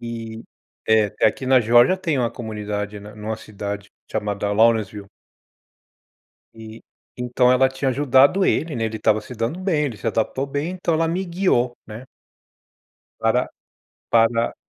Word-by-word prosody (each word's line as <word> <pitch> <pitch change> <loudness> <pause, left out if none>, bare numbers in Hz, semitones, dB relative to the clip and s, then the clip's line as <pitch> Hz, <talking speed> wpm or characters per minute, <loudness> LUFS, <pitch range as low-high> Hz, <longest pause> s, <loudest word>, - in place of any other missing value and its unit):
E, 115 -1 -7 0.4
é 110 -2 +3
é - - +6
aqui 130 +4 -1
na 130 -1 +5
Geórgia 120 - +5
tem 165 -7 -1
uma 120 -2 0
comunidade, 105 -2 -5
né, 105 +1 -12
numa 110 +1 -5
cidade 100 -1 -7 0.2
chamada 105 -1 -2
Lawrenceville. 105 -2 +2 1.5
E, 110 0 -11 0.4
então 125 0 +2
ela 130 +1 +4
tinha 135 +1 -2
ajudado 140 +7 +4
ele, 160 -3 0
né, 115 - -2
ele 110 0 -4
estava 110 0 +2
se 125 - -10
dando 120 +10 -3
bem, 165 -6 0
ele 120 -6 -5
se 110 - -5
adaptou 115 +5 -1
bem, 145 +4 -3
então 180 -2 -2
ela 165 +1 +1
me 180 +3 -1
guiou, 170 -9 0
né 110 +3 -9 1.2
para - - +1 0.6
para 115 0 +2
115 Hz, 150 wpm, -22 LUFS, 110-135 Hz, 1.5 s, é